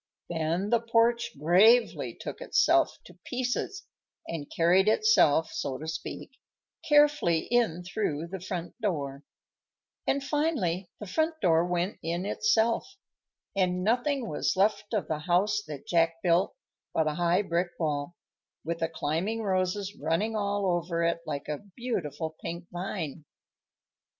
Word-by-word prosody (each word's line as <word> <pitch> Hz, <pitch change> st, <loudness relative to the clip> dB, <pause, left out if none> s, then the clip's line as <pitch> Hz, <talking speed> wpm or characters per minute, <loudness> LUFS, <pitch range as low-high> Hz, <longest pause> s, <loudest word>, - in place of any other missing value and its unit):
Then 170 Hz, +5 st, -1 dB
the 235 Hz, -, +5 dB
porch 235 Hz, +1 st, +2 dB
gravely 200 Hz, -, +4 dB
took -, -, -7 dB
itself -, -, +3 dB
to -, -, -16 dB
pieces 255 Hz, +10 st, -3 dB, 0.4 s
and 155 Hz, -4 st, -5 dB
carried 180 Hz, +4 st, +3 dB
itself, 215 Hz, -, +4 dB
so 135 Hz, -2 st, -3 dB
to 155 Hz, -, -7 dB
speak, 160 Hz, -, -6 dB, 0.6 s
carefully 295 Hz, -, +4 dB
in 225 Hz, -8 st, +2 dB
through 175 Hz, -4 st, -2 dB
the 190 Hz, +3 st, -6 dB
front 180 Hz, -2 st, -5 dB
door; 145 Hz, -9 st, -2 dB, 0.9 s
and 275 Hz, 0 st, +1 dB
finally 265 Hz, -, 0 dB
the 210 Hz, -, -6 dB
front 315 Hz, -, 0 dB
door 165 Hz, -, +3 dB
went 180 Hz, +2 st, -1 dB
in 170 Hz, +3 st, -2 dB
itself, 235 Hz, -, +1 dB, 0.6 s
and 180 Hz, -1 st, +1 dB
nothing 245 Hz, +4 st, +1 dB
was 150 Hz, -, -1 dB
left 205 Hz, +1 st, +1 dB
of 215 Hz, -4 st, -1 dB
the 155 Hz, -2 st, -2 dB
house 185 Hz, +6 st, +2 dB
that 145 Hz, -3 st, -7 dB
Jack 165 Hz, -1 st, +2 dB
built 175 Hz, +1 st, +2 dB, 0.4 s
but 160 Hz, -, +3 dB
a 155 Hz, -, 0 dB
high 175 Hz, +4 st, +2 dB
brick 175 Hz, -1 st, 0 dB
wall, 150 Hz, 0 st, -2 dB, 0.5 s
with 165 Hz, +1 st, -2 dB
the 165 Hz, -, 0 dB
climbing 170 Hz, +8 st, -2 dB
roses 190 Hz, +1 st, -1 dB
running 165 Hz, +9 st, -1 dB
all 205 Hz, -1 st, 0 dB
over 170 Hz, -2 st, 0 dB
it 170 Hz, 0 st, +1 dB
like 145 Hz, -2 st, -4 dB
a 150 Hz, -1 st, -3 dB, 0.2 s
beautiful 160 Hz, -, -3 dB
pink 170 Hz, +1 st, -5 dB
vine. 175 Hz, -4 st, -4 dB
180 Hz, 140 wpm, -28 LUFS, 165-220 Hz, 0.9 s, the